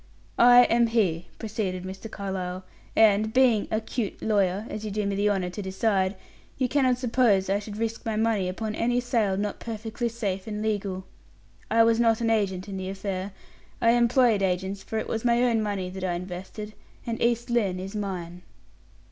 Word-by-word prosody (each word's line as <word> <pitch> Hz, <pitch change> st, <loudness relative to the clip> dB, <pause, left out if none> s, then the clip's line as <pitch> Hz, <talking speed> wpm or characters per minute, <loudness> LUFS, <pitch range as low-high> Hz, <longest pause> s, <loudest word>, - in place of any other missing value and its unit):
"I 245 Hz, +1 st, +8 dB
am 235 Hz, 0 st, +3 dB
he," 190 Hz, -8 st, 0 dB
proceeded 205 Hz, -5 st, -3 dB
Mr. 190 Hz, +4 st, -7 dB
Carlyle; 190 Hz, -2 st, -4 dB, 0.3 s
"and, 215 Hz, 0 st, +4 dB
being 245 Hz, -4 st, +3 dB
a 215 Hz, -, 0 dB
'cute 220 Hz, -1 st, -4 dB
lawyer,' 200 Hz, -1 st, +1 dB
as 215 Hz, -, -6 dB
you 215 Hz, -, -3 dB
do 210 Hz, 0 st, -2 dB
me 200 Hz, -, -1 dB
the 205 Hz, +1 st, +2 dB
honor 190 Hz, -3 st, -1 dB
to 205 Hz, -, -5 dB
decide, 190 Hz, 0 st, 0 dB, 0.4 s
you 260 Hz, -, +1 dB
cannot 255 Hz, -2 st, +2 dB
suppose 230 Hz, -6 st, +2 dB
I 200 Hz, -, +2 dB
should 210 Hz, 0 st, -8 dB
risk 225 Hz, 0 st, -3 dB
my 225 Hz, -1 st, -2 dB
money 215 Hz, -4 st, +1 dB
upon 215 Hz, +3 st, -4 dB
any 240 Hz, +3 st, +1 dB
sale 230 Hz, -6 st, 0 dB
not 205 Hz, 0 st, -2 dB
perfectly 225 Hz, +1 st, -4 dB
safe 200 Hz, -5 st, -3 dB
and 210 Hz, -1 st, -4 dB
legal. 200 Hz, -3 st, -2 dB, 0.6 s
I 225 Hz, +1 st, +5 dB
was 230 Hz, 0 st, +3 dB
not 230 Hz, -2 st, +3 dB
an 230 Hz, -1 st, +1 dB
agent 195 Hz, -3 st, 0 dB
in 195 Hz, -1 st, -5 dB
the 190 Hz, 0 st, -4 dB
affair; 195 Hz, 0 st, -4 dB, 0.5 s
I 230 Hz, -, +4 dB
employed 240 Hz, -2 st, +4 dB
agents; 190 Hz, +1 st, -1 dB
for 220 Hz, -, -5 dB
it 220 Hz, -, -2 dB
was 225 Hz, -, -2 dB
my 240 Hz, 0 st, +3 dB
own 230 Hz, -3 st, +2 dB
money 200 Hz, -4 st, -2 dB
that 190 Hz, 0 st, -7 dB
I 180 Hz, -2 st, 0 dB
invested, 185 Hz, +4 st, -6 dB, 0.3 s
and 230 Hz, -1 st, -3 dB
East 235 Hz, +1 st, +1 dB
Lynne 200 Hz, -6 st, +1 dB
is 195 Hz, +3 st, -6 dB
mine." 180 Hz, -4 st, -4 dB
210 Hz, 190 wpm, -26 LUFS, 190-230 Hz, 0.6 s, I